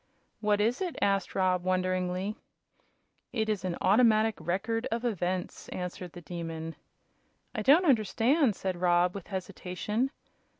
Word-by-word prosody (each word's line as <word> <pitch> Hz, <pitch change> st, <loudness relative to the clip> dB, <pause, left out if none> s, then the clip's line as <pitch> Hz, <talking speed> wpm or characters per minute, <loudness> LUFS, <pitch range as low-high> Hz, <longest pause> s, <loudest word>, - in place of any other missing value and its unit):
"What 210 Hz, -1 st, +2 dB
is 230 Hz, -, +1 dB
it?" 360 Hz, -3 st, -2 dB
asked 195 Hz, -1 st, +1 dB
Rob, 185 Hz, -2 st, +2 dB
wonderingly. 185 Hz, +2 st, 0 dB, 1.0 s
"It 220 Hz, -2 st, -1 dB
is 210 Hz, -3 st, -1 dB
an 180 Hz, -2 st, -2 dB
automatic 220 Hz, +1 st, +4 dB
Record 195 Hz, +8 st, -1 dB
of 235 Hz, +1 st, -1 dB
Events," 185 Hz, -5 st, -2 dB
answered 180 Hz, -1 st, -5 dB
the 175 Hz, -, -9 dB
Demon. 165 Hz, -1 st, -5 dB, 0.8 s
"I 225 Hz, -, -2 dB
don't 295 Hz, -, +6 dB
understand," 245 Hz, -, +3 dB
said 185 Hz, -2 st, -3 dB
Rob, 175 Hz, 0 st, +3 dB
with 200 Hz, -3 st, -8 dB
hesitation. 200 Hz, +5 st, -2 dB
195 Hz, 130 wpm, -29 LUFS, 180-225 Hz, 1.0 s, don't